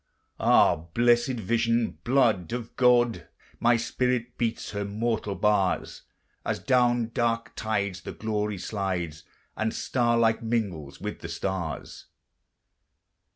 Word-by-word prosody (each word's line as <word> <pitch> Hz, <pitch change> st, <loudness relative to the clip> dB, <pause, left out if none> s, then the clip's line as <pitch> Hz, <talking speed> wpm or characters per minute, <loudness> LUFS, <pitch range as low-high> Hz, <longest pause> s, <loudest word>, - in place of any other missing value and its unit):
Ah, 80 Hz, -, +4 dB
blessèd 120 Hz, +1 st, +3 dB
vision! 115 Hz, +2 st, 0 dB
blood 115 Hz, -9 st, +2 dB
of 120 Hz, -2 st, -5 dB
God! 120 Hz, -2 st, +3 dB, 0.3 s
My 120 Hz, 0 st, +4 dB
spirit 125 Hz, 0 st, -1 dB
beats 115 Hz, -2 st, -2 dB
her 100 Hz, -1 st, -3 dB
mortal 105 Hz, 0 st, -2 dB
bars, 105 Hz, -3 st, +1 dB, 0.4 s
As -, -, -1 dB
down 120 Hz, -2 st, +2 dB
dark 115 Hz, -1 st, -1 dB
tides 100 Hz, -4 st, -2 dB
the -, -, -6 dB
glory 105 Hz, -1 st, -2 dB
slides, 90 Hz, -5 st, -3 dB, 0.3 s
And 110 Hz, 0 st, -1 dB
star 120 Hz, -2 st, +1 dB
like 115 Hz, -1 st, +3 dB
mingles 100 Hz, -11 st, -2 dB
with -, -, -5 dB
the -, -, -7 dB
stars. 85 Hz, -5 st, -4 dB
115 Hz, 115 wpm, -27 LUFS, 100-120 Hz, 0.4 s, Ah